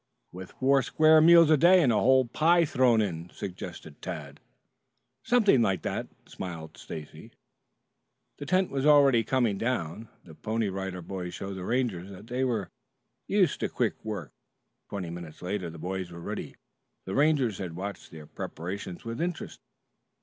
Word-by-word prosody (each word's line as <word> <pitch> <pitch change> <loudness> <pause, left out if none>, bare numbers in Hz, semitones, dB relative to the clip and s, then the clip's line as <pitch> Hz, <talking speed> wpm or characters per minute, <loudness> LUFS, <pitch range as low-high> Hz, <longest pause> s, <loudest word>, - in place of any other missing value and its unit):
"With 95 0 -10
four 135 +1 +3
square 155 +3 +5
meals 165 -1 +7
a 155 - +6
day 175 +5 +6
and 125 -5 +3
a 105 - +3
whole 130 +1 +4
pie 165 +7 +3
thrown 125 -6 +3
in," 85 -4 -3
suggested 90 -6 -8
Tad. 75 -6 -7 0.8
"Something 220 - +4
like 95 -4 +1
that," - - -3 0.2
smiled 80 -4 -7
Stacy. 75 -2 -9 1.1
The 145 - -7
tent 185 0 +2
was 135 -1 -1
already 140 -5 +6
coming 115 -4 +1
down. 115 -3 -3
The 80 - -14
Pony 110 +7 -2
Rider 95 -2 -5
Boys 90 -1 -6
showed 100 0 -5
the 95 -1 -6
Rangers 115 -7 -1
that 100 +1 -11
they 125 +3 -2
were 115 -6 -1 0.6
used - - +2
to - - -1
quick - - 0
work. 100 - -5 0.6
Twenty 95 -4 -5
minutes 85 -2 -9
later 90 -1 -3
the 85 - -10
boys 95 +2 -4
were 85 - -9
ready. 85 - -6 0.5
The 95 - -5
Rangers 140 -8 +2
had 90 -4 -5
watched 100 +3 -6
their 80 -2 -11
preparations 90 +5 -7
with 115 +6 -4
interest. 175 0 -4
105 Hz, 160 wpm, -28 LUFS, 90-135 Hz, 1.1 s, meals